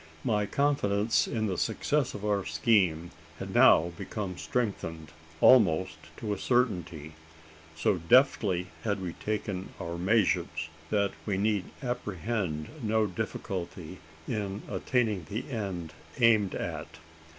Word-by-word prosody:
My 105 -2 +1
confidence 115 -5 +1
in 110 -2 -1
the 95 -4 -1
success 145 -3 0
of 105 - -6
our 100 -2 +1
scheme 85 -1 +2 0.3
had - - -6
now 85 +2 +6
become 100 -4 -4
strengthened 80 -10 -3 0.3
almost 95 -8 +5 0.2
to 105 -2 -2
a 100 - -5
certainty. 90 - 0 0.6
So 85 +4 +1
deftly 95 - +3
had 105 -2 0
we 90 -3 -4
taken 100 -3 -3
our 85 0 -5
measures, 100 +3 +1 0.2
that 100 -2 +1 0.2
we 100 -2 0
need 105 -1 +1 0.2
apprehend 105 -8 -3
no 110 0 +2
great 95 -4 -7
difficulty 90 -1 -5 0.3
in 105 -3 -3
attaining 110 - 0
the 110 +4 -4
end 95 -8 -4 0.3
aimed 110 -5 +4
at. - - -5
100 Hz, 125 wpm, -29 LUFS, 90-110 Hz, 0.6 s, now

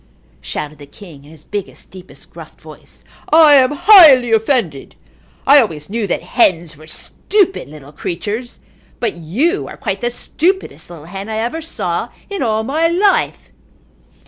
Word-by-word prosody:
shouted 150 0 -6
the 145 - -12
king 155 -3 -14
in - - -16
his 155 -1 -16
biggest, 205 -2 -7
deepest, 185 -1 -15
gruffest - - -13
voice. - - -16 0.3
"I 310 -1 +7
am 260 -1 +4
highly 295 - +7
offended. 220 - -1 0.5
I 280 +1 +7
always 160 -7 -5
knew 225 -2 -2
that 175 - -3
hens 175 -5 +1
were 155 +2 -16
stupid 385 - -2
little 145 -2 -13
creatures 205 - -6 0.4
but 230 -4 -1
you 230 - -2
are - - -10
quite - - -4
the 240 - 0
stupidest 345 - -3
little 165 -3 -12
hen 195 +4 -8
I 220 - -3
ever 240 +9 -3
saw 325 - -4 0.2
in 400 - -4
all 220 -3 0
my 305 +7 0
life." 380 +4 0
220 Hz, 155 wpm, -16 LUFS, -, 0.5 s, I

